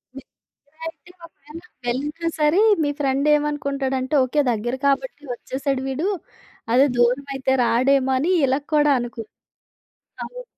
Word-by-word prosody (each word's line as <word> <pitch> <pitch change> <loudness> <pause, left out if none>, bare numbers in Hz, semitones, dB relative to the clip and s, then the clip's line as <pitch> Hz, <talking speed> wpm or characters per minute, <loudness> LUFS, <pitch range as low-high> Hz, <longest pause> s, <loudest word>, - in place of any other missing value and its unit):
మీకు 270 - -11 0.4
దగ్గరే 310 +2 -35
అయితే 325 +2 -20
ఒకవేళ 310 0 -13 0.3
వెళ్ళినా 295 +7 -2
సరే 300 +6 +3 0.2
మీ 290 - +1
ఫ్రెండ్ 275 +1 +1
ఏమనుకుంటాడంటే, 280 -2 -1
ఓకే. 275 +4 +1
దగ్గర 240 +2 -2
కాబట్టి 290 - -1
ఒచ్చేసాడు 265 +1 -3
వీడు. 275 +7 -2 0.7
అదే 265 +3 +6
దూరమైతే 265 +2 +1
రాడేమో! 265 +3 +2
అనీ 330 +7 +1 0.2
ఇలా 265 +2 +1 0.2
కూడా 295 -1 +4
అనుకుంటాడు. 235 -2 -7 0.9
అవును. - - -9
275 Hz, 125 wpm, -22 LUFS, 260-295 Hz, 0.9 s, అదే